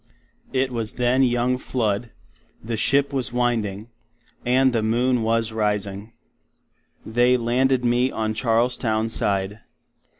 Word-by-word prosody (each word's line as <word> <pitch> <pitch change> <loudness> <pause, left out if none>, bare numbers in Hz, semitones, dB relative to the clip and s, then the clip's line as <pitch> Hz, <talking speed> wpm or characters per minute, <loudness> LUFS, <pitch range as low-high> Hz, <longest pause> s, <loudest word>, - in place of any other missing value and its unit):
It 130 0 0
was 115 -3 -3
then 125 +2 +1
young 125 0 +1
flood, 115 -3 -2 0.5
the 115 +1 -4
Ship 140 +6 +2
was 130 -4 0
winding, 115 -3 -1 0.5
and 130 +1 +3
the 115 - +1
moon 120 +3 +1
was 115 0 0
Rising. 105 -1 -2 0.9
They 120 +3 +3
landed 125 +2 +1
me 120 +2 +2
on 110 -2 -2
Charlestown 115 -1 0
side. 100 -1 -1
120 Hz, 120 wpm, -23 LUFS, 110-125 Hz, 0.9 s, and